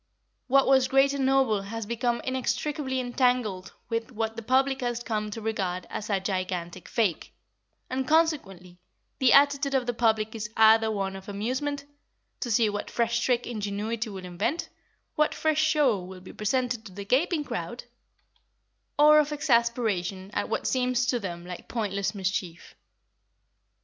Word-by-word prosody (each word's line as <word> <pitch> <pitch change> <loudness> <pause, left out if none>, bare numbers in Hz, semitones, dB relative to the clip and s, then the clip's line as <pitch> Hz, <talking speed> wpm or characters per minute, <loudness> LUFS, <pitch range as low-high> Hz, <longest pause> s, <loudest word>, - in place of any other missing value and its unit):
What 270 +1 +4
was 265 -1 +4
great 270 +1 +4
and 270 -2 0
noble 265 -6 +3
has 220 +2 -5
become 235 +2 -1
inextricably 260 +1 -2
entangled 245 -6 0
with 230 0 -3
what 225 -1 -3
the 230 - -5
public 265 +3 +1
has 240 -1 -2
come 215 -3 -2
to 225 +2 -6
regard 190 -5 -2
as 210 - -5
a 200 -2 +1
gigantic 185 -2 -4
fake, 210 -8 -1 0.5
and 260 0 -3
consequently 200 - 0 0.4
the 260 -3 +4
attitude 280 -1 +4
of 260 -2 +1
the 245 - -1
public 220 -2 +1
is 210 -2 -5
either 220 0 +6
one 195 -2 -2
of 190 +1 -9
amusement, 260 +8 -3 0.5
to 240 - -3
see 225 0 +3
what 205 0 -3
fresh 235 0 0
trick 245 0 +1
ingenuity 215 +1 -3
will 190 -2 -8
invent, 180 - -2 0.4
what 305 0 +1
fresh 310 -1 +1
show 300 -9 +3
will 185 0 -10
be 185 - -11
presented 245 +2 -1
to - - -13
the 200 +2 -8
gaping 300 - +1
crowd, - - -5 1.1
or 300 +1 +7
of 300 0 +1
exasperation 230 - 0
at - - -2
what - - -2
seems 250 -1 +1
to 245 -1 0
them 175 -4 -6
like 180 -1 -8
pointless 200 -2 -2
mischief. 185 -3 -3
230 Hz, 155 wpm, -27 LUFS, 200-260 Hz, 1.1 s, or